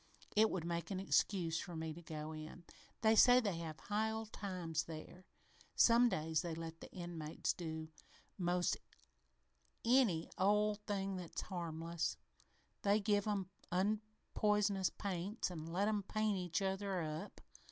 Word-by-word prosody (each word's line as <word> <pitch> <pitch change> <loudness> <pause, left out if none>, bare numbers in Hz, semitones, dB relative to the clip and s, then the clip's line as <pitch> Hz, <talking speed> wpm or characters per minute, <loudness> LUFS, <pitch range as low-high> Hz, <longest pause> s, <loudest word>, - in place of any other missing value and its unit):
It 220 +1 +6
would 170 -3 -2
make 170 0 -2
an 190 -2 -2
excuse 175 -4 +2
for 175 - -6
me 160 0 -3
to 170 - -10
go 155 -2 -5
in. 155 +3 -8 0.4
They 220 0 +5
say 245 +3 +8
they 200 -8 -1
have 160 -2 -5
high 215 +2 0
old 220 0 -4
times 175 -5 -2
there. 165 +3 -9 0.5
Some 240 +1 +6
days 160 -4 0
they 170 -2 -3
let 165 0 -6
the - - -10
inmates 170 -3 -3
do 160 -2 -5 0.5
'most 175 -1 +1 1.1
any 230 -10 +4
old 210 +2 +3
thing 195 -1 -1
that's 175 -2 -5
harmless. 170 -2 -3 0.6
They 200 0 +4
even 210 - +1
give 205 0 +2
'em 195 -3 -1 0.2
unpoisonous 210 0 +1
paints 195 +1 -3
an' 160 -2 -6
let 185 +5 +1
'em 215 -1 +1
paint 215 +1 0
each 180 0 -1
other 195 0 -1
up. 155 0 -5
185 Hz, 150 wpm, -38 LUFS, 165-210 Hz, 1.1 s, say